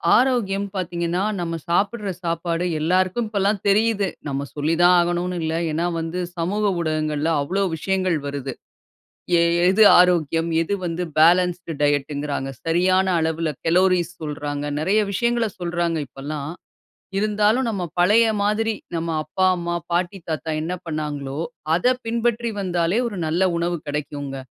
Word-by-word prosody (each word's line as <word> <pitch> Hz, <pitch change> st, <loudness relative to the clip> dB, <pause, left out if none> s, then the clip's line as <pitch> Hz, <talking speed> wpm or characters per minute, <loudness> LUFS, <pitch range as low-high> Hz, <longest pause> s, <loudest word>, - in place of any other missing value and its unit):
ஆரோக்கியம் 220 Hz, -6 st, +2 dB
பார்த்தீங்கன்னா, 175 Hz, -1 st, -2 dB, 0.2 s
நம்ம 165 Hz, -1 st, -2 dB
சாப்பட்ற 200 Hz, +4 st, 0 dB
சாப்பாடு 170 Hz, 0 st, -1 dB
எல்லாருக்கும் 185 Hz, +7 st, +1 dB
இப்பல்லாம் 200 Hz, -1 st, 0 dB
தெரியுது. 210 Hz, 0 st, +2 dB, 0.2 s
நம்ம 140 Hz, 0 st, -2 dB
சொல்லித்தான் 165 Hz, +4 st, +4 dB
ஆகணுனு 175 Hz, +1 st, 0 dB
இல்ல. 160 Hz, 0 st, -1 dB, 0.2 s
ஏன்னா, 165 Hz, +3 st, -1 dB
வந்து 165 Hz, +2 st, -3 dB, 0.2 s
சமூக 195 Hz, +6 st, -1 dB, 0.2 s
ஊடகங்கள்ல 155 Hz, 0 st, -1 dB
அவ்ளோ 190 Hz, +7 st, -1 dB
விஷயங்கள் 185 Hz, 0 st, 0 dB
வருது. 140 Hz, -2 st, -4 dB, 0.9 s
எ -, -, +4 dB, 0.3 s
எது 195 Hz, +4 st, +5 dB, 0.2 s
ஆரோக்கியம், 165 Hz, -2 st, +3 dB
எது 165 Hz, +5 st, -1 dB
வந்து 170 Hz, +1 st, -2 dB, 0.2 s
பேலன்ஸ்ட் 180 Hz, +2 st, +4 dB
டயட்டுங்கிறாங்க. 145 Hz, -1 st, 0 dB, 0.2 s
சரியான 185 Hz, +3 st, +3 dB, 0.2 s
அளவுல 160 Hz, 0 st, -1 dB, 0.2 s
கலோரிஸ் 180 Hz, 0 st, +3 dB
சொல்றாங்க. 145 Hz, -1 st, -4 dB
நிறைய 195 Hz, +7 st, +2 dB
விஷயங்கள 235 Hz, +3 st, +1 dB
சொல்றாங்க 170 Hz, -1 st, -1 dB
இப்பல்லாம். 145 Hz, +3 st, -6 dB, 0.6 s
இருந்தாலும் 215 Hz, +4 st, +2 dB
நம்ம 200 Hz, -5 st, -2 dB, 0.2 s
பழைய 215 Hz, +6 st, +5 dB, 0.2 s
மாதிரி, 220 Hz, +2 st, +1 dB, 0.2 s
நம்ம 165 Hz, 0 st, -2 dB
அப்பா, 185 Hz, +5 st, 0 dB
அம்மா, 175 Hz, 0 st, -3 dB, 0.2 s
பாட்டி, 175 Hz, +3 st, 0 dB
தாத்தா 160 Hz, 0 st, -2 dB
என்ன 165 Hz, +3 st, -3 dB
பண்ணாங்களோ! 150 Hz, -3 st, -4 dB, 0.4 s
அத 175 Hz, -, -2 dB, 0.2 s
பின்பற்றி 235 Hz, 0 st, 0 dB
வந்தாலே 175 Hz, 0 st, 0 dB
ஒரு 210 Hz, -4 st, -6 dB
நல்ல 165 Hz, +4 st, +1 dB
உணவு 170 Hz, +1 st, 0 dB
கிடைக்குங்க. 145 Hz, -1 st, -4 dB
175 Hz, 125 wpm, -22 LUFS, 155-195 Hz, 0.9 s, எது